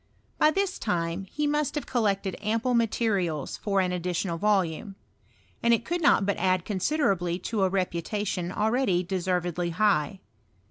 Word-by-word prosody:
By 305 - +6
this 385 +3 -1
time 175 -1 -2
he 300 +10 -3
must 295 0 0
have 295 - -2
collected 200 -6 0
ample 225 +4 0
materials 205 - 0
for 195 -2 +1
an 180 -1 0
additional 175 -1 -2
volume; 195 -2 0 0.7
and 235 0 +5
it - - -6
could 345 +1 -2
not 280 -9 +4
hut 200 - +1
add 185 -2 +1
con 205 -3 -3
siderably 185 - +1
to 220 -3 -1
a. 190 - +3
reputation 185 0 -2
already 215 -3 +1
deservedly 180 -1 -1
high. 190 -2 +1
195 Hz, 150 wpm, -27 LUFS, 180-225 Hz, 0.7 s, By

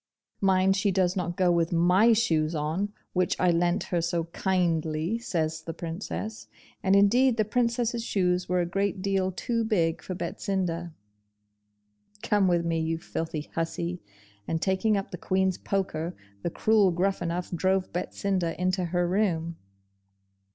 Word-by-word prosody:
'Mind 190 0 +3
she 200 +1 +1
does 185 -1 +1
not 175 -2 -2
go 180 -2 +3
with 170 -1 +1
MY 180 +7 +5
shoes 165 -8 +1
on, 160 +7 -1 0.2
which 180 -1 0
I 180 -1 +4
lent 175 +3 +1
her 170 - +2
so 170 0 0
kindly,' 170 +1 0
says 160 -8 -2
the 165 0 -7
Princess; 185 +6 -5 0.3
and 190 0 +3
indeed 235 +5 +4
the 215 - +2
Princess's 235 +1 0
shoes 180 -5 0
were 180 0 +2
a - - 0
great 195 +2 -1
deal 195 -1 +1
too 230 +5 -1
big 175 -7 +1
for 185 - -5
Betsinda. 175 -1 -2 1.3
'Come 205 -4 +3
with 170 -1 +2
me, 165 -1 0
you 160 0 -1
filthy 160 -2 -5
hussy!' 170 +1 -3 0.5
and 165 - -1
taking 195 +4 +1
up 195 - -4
the 180 - -6
Queen's 190 -1 0
poker, 180 -3 -2 0.3
the - - -1
cruel 210 +2 +3
Gruffanuff 175 -1 -1
drove 185 +2 0
Betsinda 180 -1 -2
into 185 0 0
her 175 +1 0
room. 175 -4 0
180 Hz, 150 wpm, -27 LUFS, 170-195 Hz, 1.3 s, MY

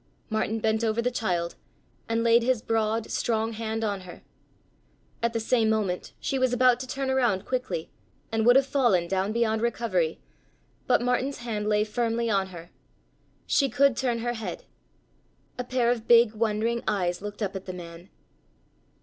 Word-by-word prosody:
Martin 220 0 0
bent 220 +1 0
over 225 0 +1
the 245 +2 +1
child 175 -8 -1 0.6
and 230 0 +1
laid 235 0 +5
his 240 -2 +1
broad, 225 0 0
strong 225 -1 0
hand 225 0 -3
on 200 -3 -1
her. 180 -1 -12 1.0
At 235 0 +1
the 230 - 0
same 225 0 +2
moment 205 -5 -1
she 270 - -1
was 255 -1 +2
about 250 0 +4
to 260 - -6
turn 265 +1 -2
around 240 -8 +1
quickly 255 -10 -3 0.4
and 225 0 +1
would 245 +2 +6
have 270 0 +5
fallen 235 -11 +2
down 190 +2 0
beyond 220 -1 +1
recovery, 215 -8 0 0.7
but - - +3
Martin's 255 +3 0
hand 215 -3 -3
lay 210 0 +3
firmly 230 +1 -1
on 195 -2 +1
her. 175 -2 -11 0.7
She 275 -2 +2
could 275 +2 +3
turn 245 -2 0
her 240 - 0
head. 225 -2 -6 1.0
A - - 0
pair 245 -1 +1
of 230 -2 -3
big, 235 -2 +6
wondering 225 +1 0
eyes 180 -4 0
looked 205 +1 -5
up 200 -1 -3
at 190 - -6
the 185 - -5
man. 175 0 -10
225 Hz, 170 wpm, -26 LUFS, 210-240 Hz, 1.0 s, would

